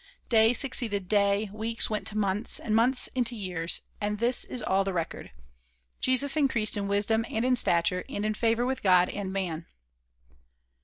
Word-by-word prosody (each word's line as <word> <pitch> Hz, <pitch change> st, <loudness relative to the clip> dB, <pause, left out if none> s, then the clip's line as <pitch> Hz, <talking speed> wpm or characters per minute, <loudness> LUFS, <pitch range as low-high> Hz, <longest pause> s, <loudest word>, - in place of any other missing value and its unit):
Day 225 Hz, -1 st, +5 dB
succeeded 225 Hz, -7 st, -1 dB
day, 200 Hz, +1 st, +1 dB
weeks 225 Hz, +2 st, -1 dB
went 215 Hz, -1 st, -3 dB
to 215 Hz, -, -3 dB
months, 205 Hz, +2 st, 0 dB
and 215 Hz, -, -2 dB
months 250 Hz, +3 st, +3 dB
into 245 Hz, -2 st, -1 dB
years, 180 Hz, -5 st, -1 dB, 0.2 s
and 210 Hz, 0 st, -2 dB
this 240 Hz, +3 st, +2 dB
is 250 Hz, -, -6 dB
all 195 Hz, +1 st, +1 dB
the 195 Hz, -1 st, -3 dB
record: 170 Hz, -2 st, -5 dB, 0.7 s
"Jesus 265 Hz, +2 st, +2 dB
increased 260 Hz, -8 st, 0 dB
in 200 Hz, -1 st, -3 dB
wisdom 205 Hz, +3 st, 0 dB
and 225 Hz, +2 st, -1 dB
in 255 Hz, 0 st, +3 dB
stature, 180 Hz, -4 st, +2 dB
and 205 Hz, -, -3 dB
in 215 Hz, -, 0 dB
favor 230 Hz, +2 st, 0 dB
with 260 Hz, +1 st, -2 dB
God 180 Hz, -2 st, +4 dB
and 200 Hz, -2 st, -5 dB
man." 175 Hz, -4 st, -4 dB
215 Hz, 170 wpm, -27 LUFS, 195-235 Hz, 0.7 s, Day